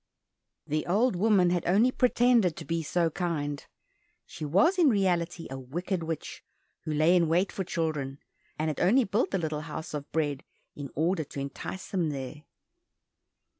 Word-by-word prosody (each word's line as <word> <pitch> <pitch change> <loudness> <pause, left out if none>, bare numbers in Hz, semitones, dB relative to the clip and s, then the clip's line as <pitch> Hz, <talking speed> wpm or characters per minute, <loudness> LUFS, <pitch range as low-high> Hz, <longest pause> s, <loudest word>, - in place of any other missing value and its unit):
The 155 +1 -2
old 210 +5 +2
woman 190 -2 +3
had 175 -1 0
only 210 +8 +4
pretended 245 -7 +3
to 160 - -8
be 165 +3 -1
so 165 +1 0
kind; 150 -5 -2 0.6
she 155 - -9
was 250 - +3
in 325 -5 +6
reality 175 -5 0
a 135 - -5
wicked 170 +8 -3
witch, 160 -2 -5 0.4
who 155 - -2
lay 155 +4 +4
in 170 -2 +4
wait 180 +4 +2
for 190 - -3
children, 155 -6 -2 0.4
and 155 - -1
had 150 - -3
only 230 +9 +4
built 210 +2 0
the 195 - 0
little 155 -3 -2
house 155 0 -7
of 145 -1 -5
bread 145 -4 -1 0.3
in 140 -2 -6
order 165 +3 +1
to 140 - -8
entice 140 +7 -6
them 175 -5 0
there. 145 +1 -6
165 Hz, 170 wpm, -28 LUFS, 150-190 Hz, 0.6 s, in